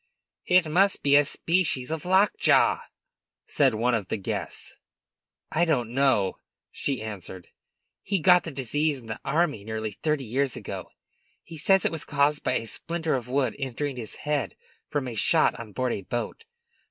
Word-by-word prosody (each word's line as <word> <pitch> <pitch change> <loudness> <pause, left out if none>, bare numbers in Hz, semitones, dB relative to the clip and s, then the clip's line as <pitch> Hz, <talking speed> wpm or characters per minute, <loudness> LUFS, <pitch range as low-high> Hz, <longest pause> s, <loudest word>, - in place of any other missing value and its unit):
"It 180 -2 +4
must 190 +6 +2
be 140 0 +5
a 145 - +7
species 155 -3 0
of 160 0 -3
lockjaw," 190 +3 +4 0.7
said - - +2
one 120 +3 +1
of 105 -5 -1
the - - -2
guests. 100 - -3 0.8
"I 165 - +2
don't 125 -9 +1
know," 130 -8 +2 0.3
she 135 -6 -2
answered. 95 -4 -8 0.5
"He 200 - 0
got 180 +1 +5
the - - -5
disease 145 +2 0
in 125 - -13
the 110 -1 -6
army 150 -6 0
nearly 110 0 -4
thirty 150 -3 0
years 130 +3 0
ago. - - -6 0.5
He 160 - -10
says 190 +4 +3
it - - +2
was 165 -3 -3
caused 145 +1 +1
by - - +1
a - - -1
splinter 165 +7 -2
of 125 -3 -2
wood 130 -3 0
entering 135 +1 -3
his 115 -4 -6
head 150 -2 -2 0.3
from 145 -3 -2
a 120 - -5
shot 160 - +3
on 115 -2 -8
board 125 +3 -1
a - - -4
boat. 120 - -5
140 Hz, 170 wpm, -26 LUFS, 115-160 Hz, 0.8 s, a